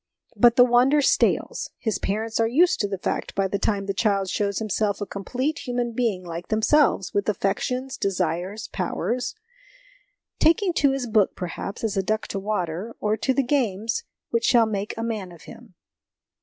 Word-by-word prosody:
But 240 -1 +5
the 250 - +8
wonder 250 +4 +4
stales; 285 - +1
his 215 -4 -2
parents 220 +3 -2
are 225 - +3
used 345 +10 +3
to 205 - +1
the 195 -1 -3
fact - - -3
by 195 0 +1
the 200 +1 -2
time 200 -1 0
the 195 - -2
child 200 -2 +1
shows 200 -1 -1
himself 210 -2 -1
a 205 - -3
complete 255 - -3
human 245 -1 -1
being 225 -6 -1
like 170 0 -6
themselves, 220 -1 +2
with 205 +1 0
affections, 250 +6 -1
desires, 185 +2 -2
powers; 250 - -2 1.0
taking 345 +3 +3
to 285 -3 +3
his 270 -2 -2
book, 215 -4 +2
perhaps, 190 +4 -6
as 215 -3 -1
a - - +3
duck 215 +3 -1
to 195 - -3
the - - -11
water; 200 +1 -3
or 210 0 +1
to 265 - 0
the 275 +1 +2
games 230 -5 0 0.3
which 230 0 +1
shall 235 -2 +5
make 205 -1 -3
a 225 - -3
man 215 -6 -3
of 165 -4 -14
him. 225 +3 -14
215 Hz, 185 wpm, -24 LUFS, 195-245 Hz, 1.0 s, the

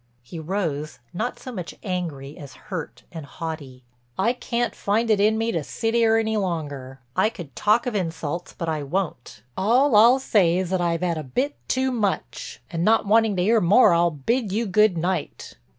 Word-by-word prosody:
He 160 +7 -8
rose, 155 -4 -3 0.2
not 220 +7 -3
so 255 - -8
much 180 -7 -6
angry 160 -7 -4
as 140 -2 -11 0.2
hurt 165 -5 -5
and 160 -3 -7
haughty. 145 -4 -7 0.3
"I 230 +5 +2
can't 240 -1 -2
find 225 +3 0
it 210 - +3
in 215 +2 +3
me 225 +1 0
to 165 -6 -2
sit 225 - -2
'ere 225 -1 +4
any 220 -1 0
longer. 145 -8 -4
I 215 - +3
could 165 - -10
talk 215 +3 +2
of 245 - -2
insults, 170 -3 -3
but 170 - -4
I 155 -2 -1
won't. 145 - -4
All 240 +7 +3
I'll 235 +5 +7
say 190 -10 +2
is 185 -1 -2
that 185 -1 +1
I've 170 0 0
'ad 170 -3 0
a - - -5
bit 260 - -2
too 260 0 +1
much, 210 -6 -3
and 165 -1 -2
not 220 +3 +3
wanting 220 0 +3
to 180 - +1
'ear 220 +3 +3
more 190 +3 +6
I'll 170 +1 +3
bid 205 - -1
you 225 +4 0
good 210 -1 +3
night." 180 +3 -3
185 Hz, 195 wpm, -23 LUFS, 160-225 Hz, 0.3 s, I'll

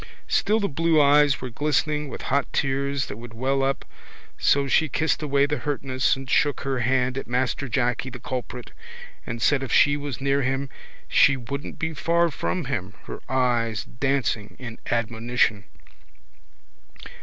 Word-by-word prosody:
Still 215 +2 +2
the 200 - 0
blue 165 +1 +2
eyes 145 -1 +5
were 125 -1 -5
glistening 150 +2 0
with - - -7
hot 140 -1 +1
tears 140 0 0
that 105 - -7
would 115 0 -10
well 135 +3 0
up 135 +1 -1 0.5
so 140 -1 +2
she 160 +3 +3
kissed 160 0 0
away 140 -2 +2
the 145 -1 -2
hurtness 130 -1 0
and 135 0 -9
shook 145 +2 +2
her 135 -2 -1
hand 130 +2 +1
at - - -8
Master 125 +2 -1
Jacky 125 0 0
the 125 - -8
culprit 125 0 -6 0.6
and 115 -1 -4
said 140 +1 +3
if 135 -4 -5
she 145 0 +5
was 145 -3 -5
near 140 +1 +1
him 135 +1 -1 0.4
she 140 - +5
wouldn't 135 +4 -6
be 160 0 -2
far 170 +2 +1
from 175 +3 -2
him, 105 -7 -4
her - - -7
eyes 120 -5 +1
dancing 125 -5 -1
in 120 -3 -8
admonition. 115 -2 0
135 Hz, 160 wpm, -24 LUFS, 125-145 Hz, 0.6 s, eyes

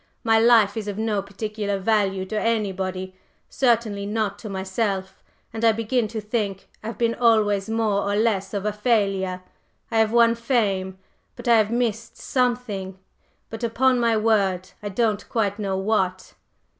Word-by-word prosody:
My 225 -2 +4
life 225 -3 +5
is 215 -2 -4
of 205 -1 -4
no 215 -2 0
particular 205 +1 -4
value 195 -2 +1
to 215 +2 -2
anybody, 190 -4 -2 0.4
certainly 225 -5 +1
not 210 -1 -2
to 215 - -7
myself; 190 0 -3 0.3
and 225 0 -5
I 225 -1 +5
begin 230 +1 0
to 220 +1 -5
think 210 -3 -3
I've 225 +2 -6
been 230 -1 +1
always 215 -4 +2
more 220 -3 +1
or - - 0
less 210 -3 +1
of 200 0 -3
a 210 - 0
failure. 195 -5 0 0.5
I 225 - +2
have 220 -1 +3
won 235 0 +5
fame, 205 -6 -1 0.4
but - - -9
I 235 - +6
have 215 -1 +3
missed 230 -1 -2
something 240 -7 -2 0.5
but 225 +1 -7
upon 250 +2 +2
my 230 -2 +2
word, 195 -4 +1
I 205 - -4
don't 210 0 -1
quite 205 -3 -1
know 195 -2 -1
what!" 190 -2 -1
215 Hz, 160 wpm, -23 LUFS, 195-230 Hz, 0.5 s, I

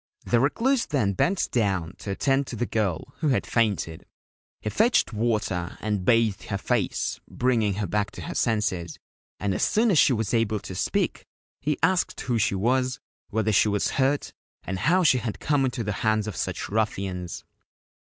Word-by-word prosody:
The 120 - +3
Recluse 235 - +1
then 115 -10 +1
bent 180 - +1
down 95 -7 0
to - - -7
attend 135 +7 +1
to - - -5
the 120 - -1
girl, 100 -9 -2
who 155 - 0
had 135 - +1
fainted. 100 - -1 0.5
He 105 - -4
fetched 230 - +3
water 105 -6 -1
and 105 -3 -2
bathed 115 -1 +2
her - - -2
face, - - -1
bringing 115 -6 +1
her 105 0 -2
back 100 +3 0
to - - -8
her - - -5
senses, 95 -8 -1 0.4
and 100 -1 0
as - - -2
soon 225 +1 +3
as 165 - +4
she - - +6
was 110 -2 -1
able 110 -2 +1
to 95 - -7
speak 90 - -1 0.3
he 150 +1 -1
asked 185 -1 +2
who 120 -3 0
she 100 - +1
was, 125 +5 +1 0.3
whether 110 0 0
she 105 +1 +4
was 105 0 0
hurt, 140 +2 0 0.3
and 95 0 -4
how 175 - +3
she 130 -6 +5
had 115 -3 -4
come 145 -2 +1
into 125 -2 -2
the 105 -1 -2
hands 110 -2 +2
of 105 -4 -5
such - - -3
ruffians. 95 -4 -2
110 Hz, 180 wpm, -26 LUFS, 100-130 Hz, 0.5 s, she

